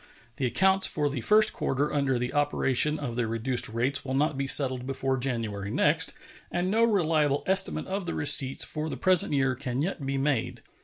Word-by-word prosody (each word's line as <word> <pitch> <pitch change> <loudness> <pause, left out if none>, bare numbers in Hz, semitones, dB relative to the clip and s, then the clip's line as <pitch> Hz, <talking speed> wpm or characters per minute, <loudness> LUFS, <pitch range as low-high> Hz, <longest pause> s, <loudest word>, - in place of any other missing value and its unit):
The 130 - -1
accounts 190 +7 +2
for 145 -2 -2
the 135 -4 -5
first 215 - +4
quarter 140 +3 -3
under 140 -3 -1
the 125 +1 -4
operation 145 0 +1
of 125 -6 -6
the 120 -2 -2
reduced 115 +2 -1
rates 125 +6 -2
will 130 -1 -4
not 150 +2 0
be 135 0 -4
settled 130 -2 +4
before 135 0 -2
January 115 -6 -4
next, - - 0 0.3
and 175 +2 -3
no 225 +2 +1
reliable 160 -9 0
estimate 190 +1 0
of 195 0 -5
the 170 - -5
receipts 135 -3 +4
for 155 0 -5
the - - -6
present 185 -2 +3
year 135 -2 0
can 130 +1 -4
yet 170 -4 -5
be 135 0 -3
made. 135 -4 -3
140 Hz, 195 wpm, -26 LUFS, 130-155 Hz, 0.3 s, first